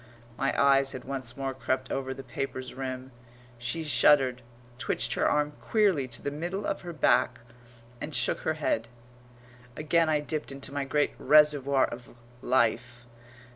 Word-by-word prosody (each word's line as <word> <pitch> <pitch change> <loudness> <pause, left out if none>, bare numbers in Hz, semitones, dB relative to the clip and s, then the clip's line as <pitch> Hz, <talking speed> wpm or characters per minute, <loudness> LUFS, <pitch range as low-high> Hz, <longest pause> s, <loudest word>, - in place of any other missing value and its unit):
My 135 +3 -1
eyes 135 -1 +4
had 130 - -7
once 130 -2 -5
more 135 -1 -2
crept 130 +1 -2
over 135 -1 -2
the 135 0 -7
paper's 130 0 -5
rim. 130 0 -5 0.5
She 120 +7 -3
shuddered, 130 -2 +4 0.4
twitched - - 0
her - - +2
arm 150 0 +1
queerly 195 - +2
to 120 -1 -7
the 145 - -2
middle 175 +7 -4
of - - -2
her 175 - -7
back 125 -5 +2 0.6
and 150 - -3
shook - - +1
her 160 - -1
head. 115 -7 -1 0.9
Again 160 +1 +2
I 155 -1 +2
dipped 150 0 -4
into 135 0 -7
my 140 -1 -2
great 145 +2 +1
reservoir 145 -3 +5
of 120 0 -10 0.3
life. 120 -1 0
135 Hz, 155 wpm, -28 LUFS, 130-150 Hz, 0.9 s, reservoir